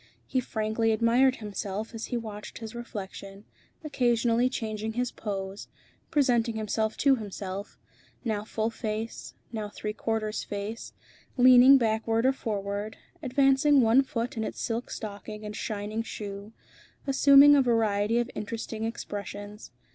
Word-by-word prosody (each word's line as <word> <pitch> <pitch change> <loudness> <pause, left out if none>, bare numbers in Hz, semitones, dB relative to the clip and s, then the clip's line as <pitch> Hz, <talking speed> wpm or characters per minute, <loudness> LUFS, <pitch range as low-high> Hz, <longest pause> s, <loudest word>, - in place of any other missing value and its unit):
He 260 - 0
frankly 220 -1 0
admired 240 +4 +3
himself 210 0 -5
as 225 0 -5
he 245 - -3
watched 215 -2 -7
his 225 -1 -8
reflection, 200 -3 -8 0.4
occasionally 240 -4 +2
changing 220 -3 -4
his 245 +1 -1
pose, 195 -1 -5 0.4
presenting 245 -7 +2
himself 220 0 -1
to 270 -1 +4
himself, 200 -2 -6 0.5
now 215 -3 -1
full 220 +1 -2
face, 220 0 -5 0.2
now 215 -3 -4
three 210 0 -5
quarters 215 -1 -2
face, 205 +3 -6 0.4
leaning 255 +2 +8
backward 225 0 +1
or 265 - +4
forward, 205 -3 -4 0.2
advancing 275 +1 +4
one 230 +3 +5
foot 240 -2 -3
in 220 - -2
its - - -5
silk 230 +1 -3
stocking 210 0 -7
and 210 0 -6
shining 215 +1 -3
shoe, 205 -2 -7 0.5
assuming 280 +1 +7
a 280 - +5
variety 225 -3 +2
of 240 0 0
interesting 220 0 -5
expressions. 205 -2 -6
225 Hz, 130 wpm, -28 LUFS, 210-245 Hz, 0.5 s, leaning